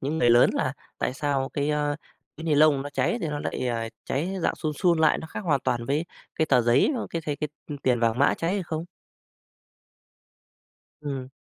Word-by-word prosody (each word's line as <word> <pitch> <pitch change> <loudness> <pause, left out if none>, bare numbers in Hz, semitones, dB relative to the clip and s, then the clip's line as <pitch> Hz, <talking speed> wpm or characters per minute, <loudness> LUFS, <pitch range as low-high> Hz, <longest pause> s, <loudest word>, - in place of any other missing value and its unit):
những 150 +4 -2
người 120 - +4
lớn 120 +1 +6
là - - 0 0.3
tại 130 - -1
sao 140 -2 -1
cái, 145 +1 0
ờ, 150 -1 0 0.4
cái 160 - -8
ni 160 -2 +2
lông 145 -2 +5
nó 145 - -6
cháy 145 - 0
thì 165 - -2
nó 150 0 -3
lại, 130 - -3
ờ, 115 -1 -2 0.2
cháy 170 +8 -2
dạng - - +1
sun 155 -2 -3
sun 175 -2 +3
lại, 160 -1 +4
nó - - -7
khác - - -6
hoàn 155 -9 +1
toàn 120 -2 -1
với 145 +6 0 0.3
cái 160 - +1
tờ 130 -5 +4
giấy, 120 - +4
ờ, - - -3
cái 165 - -3
thấy 145 -2 -1
cái, 150 +1 -3 0.2
ư, 145 - -3
tiền 125 -2 +2
vàng 115 0 +2
mã 140 - +4
cháy 165 +2 -1
hay 200 - -1
không? 160 -1 -4 2.2
Ừm. 135 -3 -4
145 Hz, 220 wpm, -26 LUFS, 130-160 Hz, 2.2 s, lớn